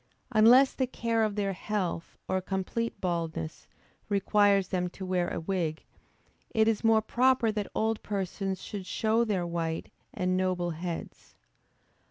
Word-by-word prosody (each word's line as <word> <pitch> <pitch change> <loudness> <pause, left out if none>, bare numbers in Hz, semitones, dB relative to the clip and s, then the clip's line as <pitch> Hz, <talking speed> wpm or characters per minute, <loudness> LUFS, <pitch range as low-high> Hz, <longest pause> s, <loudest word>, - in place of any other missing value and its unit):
Unless 245 +4 +6
the 260 - 0
care 230 -2 0
of 215 -2 0
their 200 -2 0
health, 185 -4 -3
or 185 0 0
complete 195 +5 -3
baldness, 165 - -3 0.4
requires 200 -1 +3
them 180 -1 -1
to 190 +2 -8
wear 180 -1 0
a - - -3
wig, 165 -2 -2 0.6
it 220 0 +2
is 225 -1 +1
more 225 -1 +4
proper 245 0 +3
that 210 -2 -3
old 220 0 0
persons 195 -1 -3
should 200 -3 -6
show 220 +3 +2
their 200 -6 0
white 165 -1 -3 0.2
and 185 0 0
noble 185 -2 0
heads. 170 +1 -6
195 Hz, 145 wpm, -29 LUFS, 180-220 Hz, 0.6 s, Unless